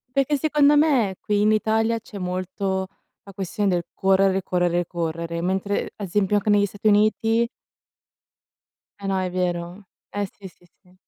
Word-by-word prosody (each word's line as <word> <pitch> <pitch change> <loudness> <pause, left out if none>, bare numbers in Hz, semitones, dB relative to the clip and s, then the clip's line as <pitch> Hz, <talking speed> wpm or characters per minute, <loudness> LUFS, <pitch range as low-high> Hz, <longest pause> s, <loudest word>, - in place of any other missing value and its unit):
Perché 275 +2 +2
secondo 295 0 +4
me, 265 -11 +3
qui 205 -1 0
in 210 +1 +4
Italia, 220 +1 +1
c'è 210 -2 -11
molto 185 +1 -2 0.4
la 200 - -12
questione 195 +2 -1
del 175 -2 0
correre, 195 0 +2
correre, 175 -1 0
correre, 170 0 -3
mentre, 190 +3 -1
a 205 - -6
esempio 205 +2 +1
anche 205 +1 -1
negli 205 0 +4
Stati 205 +2 -3
Uniti 225 +2 +3 1.5
Eh, 200 - -4
no 195 -1 0
è 185 -1 -2
vero. 180 +1 -3 0.2
Eh, 205 0 -2
sì, 200 - -11
sì, 175 - -26 0.2
sì. 180 0 -24
195 Hz, 155 wpm, -23 LUFS, 180-215 Hz, 1.5 s, secondo